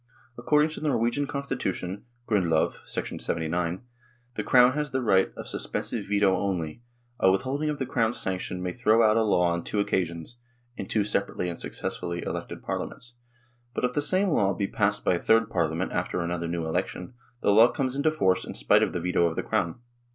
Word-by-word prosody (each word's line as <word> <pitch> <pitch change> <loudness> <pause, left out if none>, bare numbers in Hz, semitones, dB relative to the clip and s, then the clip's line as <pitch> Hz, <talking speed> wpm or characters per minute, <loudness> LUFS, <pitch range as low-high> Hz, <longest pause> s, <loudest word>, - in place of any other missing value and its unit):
According 150 +6 +2
to - - -7
the 155 - -2
Norwegian 135 +2 +1
Constitution 115 -9 -3 0.2
(Grundlov, 85 -7 +1
79), 85 +4 -2 0.5
the - - -3
Crown 125 0 +5
has 150 +1 -2
the 130 - -1
right 95 -4 +3
of - - -7
sus - - -2
pensive 110 -4 -3
veto 100 -2 +3
only; 90 -3 -2 0.4
a 95 - +5
withholding 130 +11 0
of 150 - -2
the 130 - -2
Crown's 115 -1 0
sanction 90 -1 -3
may 90 -1 -2
throw 115 -1 +3
out 110 -1 +4
a 115 - +3
law 90 -5 +3
on 85 0 -3
two 105 - -2
occasions 90 +1 -2 0.4
(in - - -6
two 105 - +1
separately 100 -3 -1
and 85 - -6
successively 85 0 -4
elected - - -5
Parliaments), 120 0 -5 0.6
but - - +1
if 125 - -1
the 145 - +1
same 185 +6 +2
law 100 - +2
be 100 - -1
passed 105 +1 0
by - - +4
a 85 - -1
third 115 -1 +3
Parliament 85 +1 -1
after - - -2
an 85 0 -2
other 85 -1 -2
new 85 -1 -2
election, 90 +5 -3 0.3
the - - +3
law 110 +3 +8
comes 130 +1 -2
into 140 +3 +2
force 95 -12 +1
in - - -7
spite - - +4
of - - +1
the - - -1
veto 85 0 +2
of 80 - -3
the - - -2
Crown. 85 - -1
100 Hz, 200 wpm, -27 LUFS, 90-125 Hz, 0.6 s, law